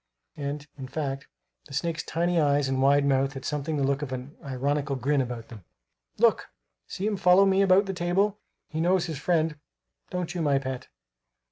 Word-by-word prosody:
(And, 145 0 -4
in 130 - -6
fact, 135 0 -4 0.4
the 140 - -8
snake's 165 +1 -1
tiny 175 +1 0
eyes 145 -1 +2
and 130 0 0
wide 140 +1 +4
mouth 135 0 +2
had 135 -1 -8
something 150 +1 -2
the 140 - 0
look 140 +1 +1
of 145 -3 -4
an 130 +3 -6
ironical 140 +1 -1
grin 135 +2 +1
about 120 -3 -5
them.) 110 -5 -11 0.5
"Look! - - +3 0.4
See 195 - -4
him 210 -1 0
follow 180 +1 +6
me 195 0 +3
about 195 +1 +5
the 195 - -3
table. 190 +4 +1 0.3
He 155 +1 -3
knows 180 +1 +2
his 160 -5 -5
friend 160 -1 +1 0.5
don't 180 -2 -3
you, 175 - -2
my 145 -3 +3
pet? 130 -1 -4
145 Hz, 190 wpm, -27 LUFS, 135-175 Hz, 0.5 s, follow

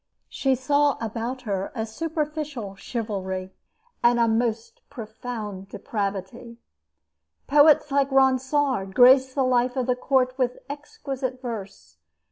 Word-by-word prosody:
She 270 -1 +1
saw 285 +3 +2
about 230 +3 -4
her 195 -4 -3
a 220 -2 -2
superficial 300 -4 -4
chivalry 190 -4 -4 0.5
and 240 0 +4
a 230 - +4
most 225 0 -1
profound 215 -5 -7
depravity. 205 +3 -5 0.9
Poets 295 0 +5
like 275 0 +2
Ronsard 265 -5 +2
graced 260 +1 +6
the 275 - +2
life 250 0 +2
of 255 -2 0
the 250 0 +1
court 255 0 +1
with 250 -1 0
exquisite 275 -3 -5
verse. 195 - -8
250 Hz, 115 wpm, -24 LUFS, 220-270 Hz, 0.9 s, graced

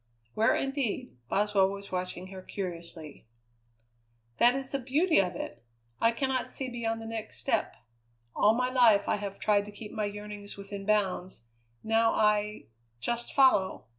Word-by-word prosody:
"Where, 220 +1 +3
indeed?" 270 - -2
Boswell 200 -1 +3
was 200 0 -8
watching 185 0 -4
her 190 -1 -8
curiously. 170 - -7 1.1
"That 245 +2 +6
is 270 -1 -3
the 275 - -1
beauty 295 - +3
of 180 -2 -3
it! 120 -8 -7 0.4
I 230 - +4
cannot 260 +1 -1
see 265 -1 -3
beyond 225 -2 -3
the - - -8
next 225 -1 -6
step. - - -1 0.6
All 215 +2 +4
my 250 +1 0
life 230 -6 +5
I - - +2
have 200 -1 -5
tried 205 -1 +2
to 210 - -9
keep 210 +1 -9
my 215 -2 -2
yearnings 205 0 -7
within 200 0 -7
bounds; 190 - 0 0.4
now 225 +1 +3
I 210 0 +1 0.3
just 235 - -3
follow. 260 -9 +3
210 Hz, 155 wpm, -29 LUFS, 195-235 Hz, 1.1 s, That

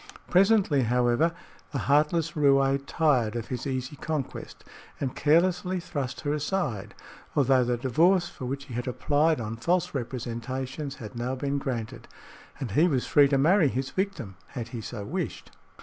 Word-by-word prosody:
Presently, 190 -6 +4
however, 120 +6 +2 0.4
the 145 - -2
heartless 155 +3 +2
roué 140 -2 +3
tired 125 -9 +2
of 115 -2 -4
his 125 +1 -4
easy 130 +1 -3
conquest 150 -2 -5 0.4
and 135 -3 -3
carelessly 180 +4 +2
thrust 140 -7 -4
her 145 -1 -1
aside, 150 - -2 0.4
although 135 -2 +4
the 120 0 0
divorce 170 +9 +3
for 130 - -8
which 140 +2 -4
he 130 - -10
had 120 +2 -3
applied 145 +4 +1
on 115 0 -4
false 175 +8 0
representations 130 +2 -4
had 110 -1 -9
now 120 +2 -2
been 140 +1 -1
granted, 120 -5 -5 0.5
and 130 -7 -4
he 155 - +4
was 135 -7 0
free 145 -1 +5
to 140 0 +2
marry 165 +4 +4
his 130 0 -2
victim 160 - -3
had 120 -4 -6
he 115 -1 -6
so 110 -2 -6
wished. - - -4
135 Hz, 160 wpm, -27 LUFS, 125-155 Hz, 0.5 s, free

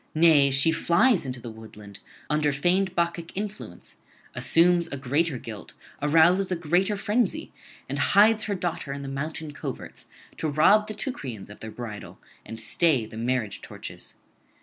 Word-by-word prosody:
Nay, 155 -4 +5
she 135 +4 +3
flies 170 - +3
into 125 -1 -5
the 120 -1 -8
woodland 105 -2 -12 0.3
under 150 -1 +1
feigned 180 +6 +1
Bacchic 170 0 -2
influence, 210 +1 -7 0.4
assumes 170 +1 +3
a 140 - -6
greater 140 +3 0
guilt, 110 -3 -9 0.3
arouses 165 +6 +4
a - - +2
greater 175 +5 +1
frenzy, 210 +2 -1 0.3
and 140 +2 -4
hides 215 +7 +4
her 205 - -1
daughter 170 -6 -3
in 140 0 -6
the - - -6
mountain 150 +3 -5
coverts 145 - -8 0.3
to 160 - -1
rob 195 +9 +4
the 215 - -6
Teucrians 130 - -6
of 105 - -13
their 110 - -7
bridal 110 -2 -8 0.2
and 115 - -5
stay 125 +3 +2
the 110 - -12
marriage 115 -3 -2
torches. - - -10
155 Hz, 155 wpm, -26 LUFS, 130-180 Hz, 0.4 s, Nay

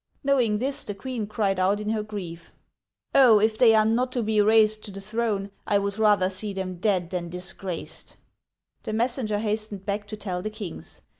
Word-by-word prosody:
Knowing 250 -6 +2
this, 270 +5 -2
the 205 - -5
queen 235 0 -4
cried 200 -3 0
out 195 +3 +2
in 210 0 -3
her 220 -1 0
grief, 180 -6 -8 0.6
Oh! 245 -6 +7
if 215 +1 +2
they 225 -1 +6
are 215 0 +4
not 245 +3 +1
to 245 - 0
be 215 -1 +2
raised 215 0 +4
to - - -7
the 195 0 -8
throne, 210 -1 -2 0.2
I 205 - +3
would 200 +1 -2
rather 205 -4 +4
see 200 +2 -4
them 185 -2 -4
dead 185 -4 0
than 175 -2 -3
disgraced! 180 -2 -6 0.3
" - - -51
The 215 - -3
messenger 230 -2 0
hastened 210 -2 -3
back 205 0 -3
to 215 +1 -7
tell 180 -4 -4
the 215 - -3
kings. 210 -5 -8
210 Hz, 200 wpm, -25 LUFS, 195-220 Hz, 0.6 s, Oh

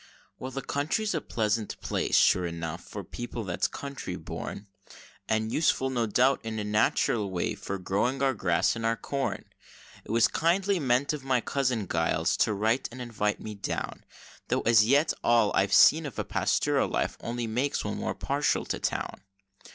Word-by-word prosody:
Well, 130 - -5
the 135 +1 -5
country's 175 +10 -1
a 160 - -1
pleasant 110 -1 -2
place, - - 0
sure 90 -1 +4
enough, 85 -1 -5
for - - -7
people 120 -1 -6
that's 90 -3 -1
country 140 -10 -6
born, 90 +4 -6 0.6
And 110 0 0
useful, 135 -3 +1
no 120 -3 0
doubt, 125 +5 +3
in 110 -1 -4
a 105 - -2
natural 105 0 +1
way, 90 -2 -1
for 100 - -5
growing 110 +9 -1
our 135 -1 +3
grass 90 -4 +1
and 115 - -5
our 115 0 +1
corn. 140 +2 -3 0.6
It - - -18
was 115 +1 +4
kindly 185 +4 +1
meant 130 +1 +1
of 150 -3 -5
my 130 -2 +2
cousin 125 -5 -1
Giles, 80 0 +1
to - - +2
write 110 +5 0
and 125 - -10
invite 105 -4 -2
me 110 - -6
down, 100 - -4 0.4
Tho' - - +1
as 115 -2 +5
yet 145 +5 +4
all 115 -3 +4
I've 95 0 +2
seen 155 +9 +6
of 135 - -9
a - - -1
pastoral - - +1
life - - -1
only 120 0 -3
makes 125 +6 -1
one - - -3
more - - -2
partial - - 0
to - - -3
town. - - -3
115 Hz, 180 wpm, -28 LUFS, 105-135 Hz, 0.6 s, seen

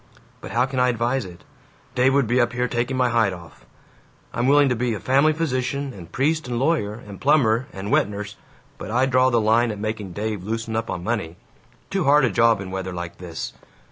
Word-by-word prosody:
But - - -8
how 120 +2 +2
can 135 -1 -3
I 125 0 +4
advise 120 +1 0
it? 90 -2 -12 0.5
Dave 130 +2 +3
would 140 -2 +3
be 120 +3 +2
up 120 +1 0
here 125 0 0
taking 120 +2 -1
my 125 -1 +2
hide 115 -5 +2
off. 80 -9 -13 0.7
I'm 120 +2 0
willing 145 +1 +5
to 125 - +1
be 120 -1 -1
family 135 +8 +3
physician 140 -3 -2
and 85 -5 -11
priest 155 +2 0
and 120 -1 -2
lawyer 130 -6 0
and 105 -4 -11
plumber 130 -4 +3
and 95 +2 -6
wet - - +3
nurse, 105 0 -6 0.4
but - - -7
I 125 +4 +2
draw 130 0 +3
the 120 -2 +2
line 115 +2 +3
at 105 - -4
making 105 -3 -4
Dave 105 -2 -3
loosen 115 +2 -3
up 110 0 -2
on 85 - -4
money. 100 -7 -2 0.6
Too 195 -2 0
hard 145 0 +5
a 120 - 0
job 115 -2 +3
in 95 -1 -7
weather 95 -1 -4
like 85 -1 -6
this! 85 -5 -6
120 Hz, 215 wpm, -23 LUFS, 105-130 Hz, 0.7 s, willing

